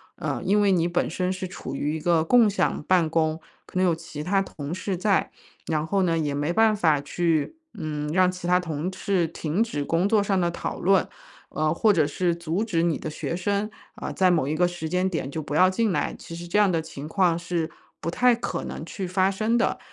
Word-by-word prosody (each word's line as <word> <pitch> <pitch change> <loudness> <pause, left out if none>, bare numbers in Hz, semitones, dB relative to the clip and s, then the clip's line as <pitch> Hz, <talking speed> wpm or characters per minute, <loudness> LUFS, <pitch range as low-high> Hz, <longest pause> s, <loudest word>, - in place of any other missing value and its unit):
呃， - - -3
因 205 +2 +3
为 200 -1 +4
你 170 -2 +2
本 175 0 0
身 180 +2 -1
是 185 0 -4
处 175 - -7
于 150 +3 -1
一 160 - -5
个 165 -1 +3
共 230 +3 +5
享 195 - 0
办 175 -3 +3
公， 160 0 +1 0.3
可 - - -7
能 185 - +4
有 170 -2 +3
其 160 -2 -8
他 195 +4 +1
同 155 -4 -6
事 185 0 -3
在， 195 +1 +1 0.4
然 155 0 -1
后 195 +1 +1
呢 165 -2 +1
也 150 -3 -1
没 145 +3 -1
办 220 +3 +4
法 160 -7 +3
去， 165 - -1 0.2
嗯， 150 -1 -3
让 185 0 +4
其 180 -1 -6
他 180 0 +4
同 165 0 -3
事 185 -1 0
停 170 +5 -1
止 145 -11 -3
工 170 +4 +1
作 215 -2 +4
上 195 -1 +1
的 175 -1 +1
讨 - - -5
论， 195 0 +3 0.4
呃， 155 0 0
或 215 +5 +3
者 155 -4 +3
是 170 +3 0
阻 170 +4 -2
止 170 -7 0
你 170 -2 +1
的 155 - -5
学 160 +2 -4
生， 200 +3 -1 0.3
呃， - - -5
在 185 -1 +3
某 160 -6 +2
一 150 - -1
个 175 +2 +3
时 175 -2 -5
间 185 +2 +1
点 150 -6 -3
就 160 - -3
不 150 0 -5
要 185 +3 +6
进 215 +3 +1
来， - - -1
其 165 - -9
实 175 0 -7
这 205 +5 +2
样 200 -3 +4
的 165 -1 +1
情 150 -2 -8
况 175 -1 +2
是 170 -2 -2 0.3
不 165 - -2
太 250 +2 +4
可 235 - -4
能 - - -6
去 190 -3 -5
发 185 +1 +2
生 220 +4 +1
的。 230 - 0
175 Hz, 255 characters per minute, -25 LUFS, 160-190 Hz, 0.4 s, 要